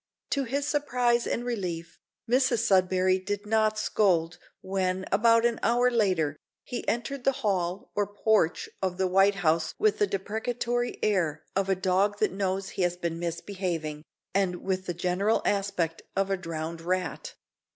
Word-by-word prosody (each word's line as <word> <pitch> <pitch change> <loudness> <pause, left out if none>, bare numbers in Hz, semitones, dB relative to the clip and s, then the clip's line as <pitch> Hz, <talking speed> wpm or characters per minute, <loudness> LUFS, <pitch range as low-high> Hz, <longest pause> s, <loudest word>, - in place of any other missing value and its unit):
To 275 -1 +1
his 280 +4 -2
surprise 245 -5 +1
and 240 - -2
relief; 180 -8 -4 0.3
Mrs 245 -2 +2
Sudberry 185 0 +3
did 205 +2 -3
not 215 0 +2
scold 175 -6 +1 0.2
when, 190 -1 -1
about 230 +1 +4
an 235 -1 +1
hour 245 +2 +3
later, 185 -10 +1 0.3
he 245 - -5
entered 245 +3 -2
the 270 - +4
hall 185 -1 -1
or 205 -1 0
porch 205 -4 +1
of 185 -2 -1
the 190 - +1
White 195 +2 +4
House 160 +1 +2
with 430 -1 +2
the 415 - +3
deprecatory 240 - -2
air 170 -8 +1
of 195 0 +1
a 190 - +3
dog 190 +2 +1
that 215 - +1
knows 195 0 -1
he - - -4
has 175 0 +1
been 170 -2 -3
misbehaving, 170 -3 -3 0.3
and 185 -3 0
with 185 -1 -2
the 175 - -2
general 185 +5 +1
aspect 195 -5 0
of 195 0 0
a - - +3
drowned 165 -2 -5
rat. 180 -2 -3
195 Hz, 160 wpm, -28 LUFS, 180-225 Hz, 0.3 s, about